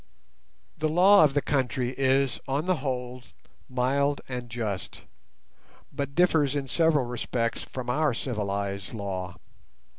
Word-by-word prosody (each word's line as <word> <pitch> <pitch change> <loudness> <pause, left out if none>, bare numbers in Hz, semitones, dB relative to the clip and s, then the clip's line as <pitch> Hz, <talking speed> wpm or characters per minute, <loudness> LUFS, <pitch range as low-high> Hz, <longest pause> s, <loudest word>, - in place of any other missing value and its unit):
The 155 +1 +1
law 190 +5 +6
of 145 -2 +3
the 145 - +2
country 130 -2 0
is, 135 -1 +2
on 140 +4 -1
the 185 -2 +1
whole, 125 -2 -4 0.5
mild 140 +3 +1
and 125 -2 -5
just, 110 -5 -4 0.9
but 140 0 -4
differs 160 -6 +3
in 140 -2 -2
several 160 -2 +2
respects 120 -1 -2
from 130 -2 -7
our 145 +1 +1
civilized 100 -4 -3
law. 95 -3 -4
130 Hz, 125 wpm, -27 LUFS, 120-145 Hz, 0.9 s, law